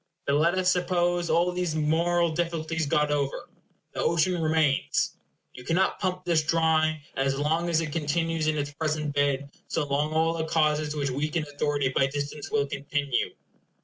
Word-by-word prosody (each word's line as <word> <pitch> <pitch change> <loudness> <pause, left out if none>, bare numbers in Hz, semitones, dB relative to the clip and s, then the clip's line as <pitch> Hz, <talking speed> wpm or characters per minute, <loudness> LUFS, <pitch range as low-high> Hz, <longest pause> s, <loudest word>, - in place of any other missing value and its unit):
But 140 - +1
let 165 +5 +3
us 185 0 +3
suppose 175 -1 +1
all 170 +3 +3
these 180 -3 -2
moral 165 +2 +2
difficulties 165 -1 -2
got 150 +1 +2
over. 140 -2 -2 0.4
The - - -3
ocean 170 +1 +1
remains. 155 -3 +1 0.4
You 125 - -11
cannot 175 +7 +1
pump 185 -1 -2
this 170 -3 +3
dry; 155 -1 +1
and 135 0 0
as 135 0 0
long 160 +4 0
as 165 -1 +2
it 155 -2 -4
continues 165 +1 -1
in 155 0 +1
its 145 0 -2
present 155 -1 -2
bed, 140 -1 0 0.2
so 160 - -1
long 145 +2 0
all 160 +1 +2
the 160 -1 -2
causes 155 -1 +1
which 140 -2 -1
weaken 150 +4 -1
authority 145 -1 -1
by 135 0 +2
distance 145 +1 -5
will 145 -1 +1
continue. 140 -2 -2
155 Hz, 175 wpm, -27 LUFS, 145-165 Hz, 0.4 s, let